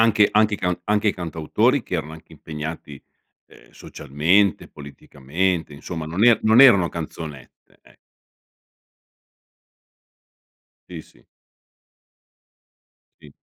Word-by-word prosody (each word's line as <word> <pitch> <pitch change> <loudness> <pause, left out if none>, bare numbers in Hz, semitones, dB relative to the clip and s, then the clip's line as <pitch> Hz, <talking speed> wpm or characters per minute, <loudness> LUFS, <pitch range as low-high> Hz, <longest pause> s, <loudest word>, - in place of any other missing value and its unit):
anche 115 -2 +3
i 105 - +5
anche 105 -1 +2
cant 90 -2 -3
anche 105 0 0
cantautori 90 - -1
che 90 - -4
erano 80 0 -6
anche 80 0 -15
impegnati, 75 -1 -8 0.5
ehm, - - -21
socialmente, 90 +9 -1
politicamente, 75 +4 -4
insomma, 80 +2 -7
non 90 +8 -1
er 120 -2 +5
non 110 +4 +6
erano 100 -10 +5
canzonette, 80 -4 -10
eh. - - -24 2.9
Sì, - - -9
sì. - - -25 2.0
Sì. 75 -2 -17
85 Hz, 100 wpm, -21 LUFS, 75-105 Hz, 2.9 s, non